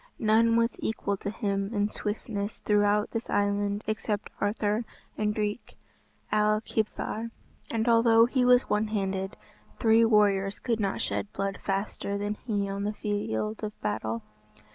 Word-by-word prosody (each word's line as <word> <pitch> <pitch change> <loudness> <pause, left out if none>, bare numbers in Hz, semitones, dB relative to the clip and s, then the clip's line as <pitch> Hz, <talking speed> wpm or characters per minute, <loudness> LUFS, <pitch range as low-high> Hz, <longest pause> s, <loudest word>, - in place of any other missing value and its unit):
None 225 +1 +4
was 230 +1 +2
equal 200 -2 -1
to 200 - -4
him 200 -1 -2
in 205 0 +2
swiftness 210 -1 -3
throughout 210 0 +2
this 230 0 -4
island 205 0 0
except 210 -1 -2
Arthur 210 +2 0 0.3
and 210 0 0
Drych 210 +1 -3 0.6
Ail 215 0 +3
Kibthar. 220 +1 -2 0.4
And 225 0 -1
although 230 -1 +6
he 250 +1 +1
was 250 0 +5
one 210 +1 +1
handed, 195 -2 -2 0.4
three 225 -1 +5
warriors 200 -3 +3
could 230 -3 -1
not 195 -2 -1
shed 205 - -2
blood 195 0 -2
faster 200 0 -2
than 205 +1 -1
he 210 -2 -2
on 195 0 -3
the 210 +1 -1
field 210 - -2
of 210 0 -5
battle. 110 +1 -2
210 Hz, 145 wpm, -28 LUFS, 200-220 Hz, 0.6 s, although